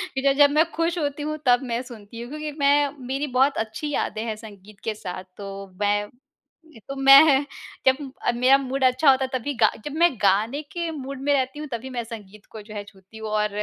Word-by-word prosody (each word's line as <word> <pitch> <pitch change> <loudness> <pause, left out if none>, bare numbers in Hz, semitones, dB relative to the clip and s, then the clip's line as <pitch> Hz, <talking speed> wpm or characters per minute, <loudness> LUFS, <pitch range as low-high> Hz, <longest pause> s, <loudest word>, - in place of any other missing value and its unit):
फ़िर 265 +1 0
अगर 285 +1 +6
मैं 310 +3 +4
खुश 335 +2 -1
होती 290 -1 -2
हूँ 305 +1 -3
तब 245 0 +4
मैं 240 -1 -2
सुनती 230 -2 -11
हूँ 240 - -8
क्योंकि 300 +1 -5
मैं 285 0 +4 0.2
मेरी 275 +3 -2
बहुत 270 +2 +3
अच्छी 220 +7 -3
यादें 220 -6 -2
हैं 220 -2 -3
संगीत 210 -2 -14
के 220 - -1
साथ 185 -2 -7
तो 200 - -8 0.4
मैं 205 0 +1 0.8
तो 275 - -4
मैं 275 +1 +7 0.4
जब 265 0 +5 0.4
मेरा 255 +3 +5
मूड 270 0 -3
अच्छा 255 +3 +4
होता 265 0 +1
है, - - -7
तभी 285 +4 -4
गा 220 -2 +4
जब 295 - -5
मैं 345 -3 +5
गाने 215 +9 +2
के 340 -1 -3
मूड 275 -3 -7
में 285 +1 +2
रहती 265 +1 -1
हूँ 305 - -5
तभी 235 +2 -5
मैं 245 -2 -3
संगीत 210 -3 -11
को 220 - -9
जो 210 +1 -12
है, 205 - -4
छूती 195 +1 -17
हूँ। 220 0 -6
और 210 0 +1
260 Hz, 215 wpm, -24 LUFS, 220-285 Hz, 0.8 s, मैं